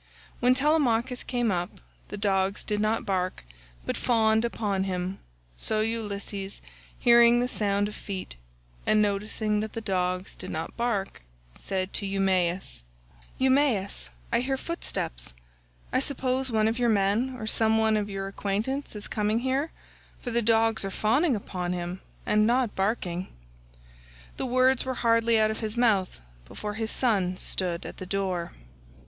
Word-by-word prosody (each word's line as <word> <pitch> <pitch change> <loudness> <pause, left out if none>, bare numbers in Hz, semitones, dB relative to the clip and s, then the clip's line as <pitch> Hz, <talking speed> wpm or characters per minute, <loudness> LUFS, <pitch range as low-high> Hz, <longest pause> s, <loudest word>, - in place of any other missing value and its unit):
When 250 +1 +4
Telemachus 260 -4 +2
came 240 -3 0
up, 175 -1 -3 0.3
the - - -6
dogs 195 -1 +1
did 210 -1 0
not 215 +1 +1
bark 185 - -1 0.4
but - - -1
fawned 220 -2 +3
upon 205 -5 -1
him, 185 0 -3 0.4
so 215 - +1
Ulysses, 205 -3 -3 0.4
hearing 235 0 +6
the 245 - +1
sound 205 -4 0
of 210 - -7
feet 190 - -6 0.5
and 215 - +4
noticing 210 +1 0
that 215 0 -4
the - - -3
dogs 185 -3 -1
did 185 - -7
not 160 +1 -4
bark, 230 -5 -1 0.3
said 185 - -3
to 200 - -1
Eumaeus: 190 - 0 0.5
"Eumaeus, 260 - +2 0.2
I - - +4
hear 265 +2 -1
footsteps; - - -4 0.6
I - - +4
suppose 260 -1 0
one 220 -2 +2
of 225 +2 -1
your 240 -1 +3
men 215 +5 +2
or 220 - -5
some 220 0 +3
one 220 0 +3
of 210 -1 -1
your 195 -1 -3
acquaintance 215 +8 -2
is 205 - -3
coming 215 +2 0
here, 265 +4 0 0.5
for 245 - -5
the 235 +1 +2
dogs 225 -1 +3
are 195 - -2
fawning 245 - +2
upon 180 -3 -3
him 180 +1 -4 0.2
and 215 0 +3
not 245 -1 +2
barking." 190 -3 -1 1.1
The - - -2
words 255 +1 +3
were 260 0 -3
hardly 230 -1 +3
out 215 0 +3
of 220 - -5
his 220 0 -3
mouth 210 -6 +2 0.3
before 210 - -5
his 220 +1 -2
son 195 -9 +1
stood 175 -3 -2
at - - -8
the 185 - -7
door. 185 -3 -2
215 Hz, 155 wpm, -27 LUFS, 195-235 Hz, 1.1 s, hearing